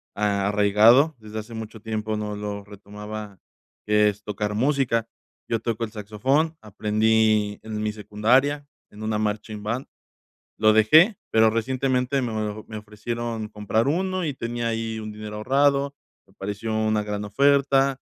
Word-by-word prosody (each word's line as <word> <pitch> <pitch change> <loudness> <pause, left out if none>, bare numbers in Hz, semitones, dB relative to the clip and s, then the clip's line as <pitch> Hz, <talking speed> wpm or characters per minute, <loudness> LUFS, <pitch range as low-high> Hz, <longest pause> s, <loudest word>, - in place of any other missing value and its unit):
a 100 -1 0
arraigado 110 +9 +5
desde 110 0 -7
hace 110 +2 -9
mucho 110 -1 -7
tiempo 110 -1 -3
no 105 -1 -4
lo 105 -1 -5
retomaba, 105 -1 -9 0.5
que 105 0 +4
es 105 0 -7
tocar 105 0 -3
música. 125 -3 +1 0.4
Yo 115 - +1
toco 115 -1 -2
el - - -10
saxofón, 130 +10 0
aprendí 110 0 +1
en 110 -1 -5
mi 105 - 0
secundaria 125 +8 +1 0.2
en 105 - -12
una 110 -1 -1
marching 105 0 -3
band. 120 +5 -3 0.7
Lo 110 0 +5
dejé, 155 - +6
pero 110 0 +5
recientemente 130 +3 0
me 115 -2 -2
o 110 0 -3
me 110 -1 -6
ofrecieron 110 +1 -5
comprar 110 +2 -1
uno 185 +3 0
y 145 - -2
tenía 120 -1 -3
ahí 115 0 -3
un 110 0 -6
dinero 105 0 -7
ahorrado, 140 +4 +2 0.3
me 95 - -26
pareció 105 +3 -4
una 110 -1 +1
gran 105 0 -3
oferta, 135 +3 +3
110 Hz, 150 wpm, -24 LUFS, 105-125 Hz, 0.7 s, dejé